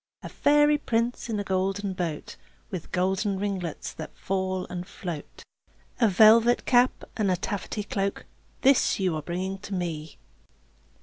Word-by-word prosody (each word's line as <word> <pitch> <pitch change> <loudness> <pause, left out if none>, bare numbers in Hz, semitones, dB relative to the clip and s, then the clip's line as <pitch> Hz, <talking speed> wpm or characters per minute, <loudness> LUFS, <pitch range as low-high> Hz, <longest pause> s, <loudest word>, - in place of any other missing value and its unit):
A - - -6
fairy 295 0 +4
prince 235 -2 -1
in 215 -2 -1
a - - -1
golden 195 +1 -1
boat, 170 -5 -4 0.4
With 180 -5 -6
golden 190 +2 0
ringlets 190 -5 -3
that 155 - -9
fall 185 -1 -2
and 180 +1 -6
float, 170 -8 -7 0.6
A 235 - +5
velvet 220 +4 +6
cap, 245 0 +3
and 210 -3 +1
a 185 - +3
taffety 205 +3 -4
cloak, 195 -1 -2 0.4
This 270 -5 +4
you 185 -4 +1
are 155 - -3
bringing 185 +4 -4
to 195 +1 -6
me. 160 -4 -4
195 Hz, 145 wpm, -26 LUFS, 180-220 Hz, 0.6 s, velvet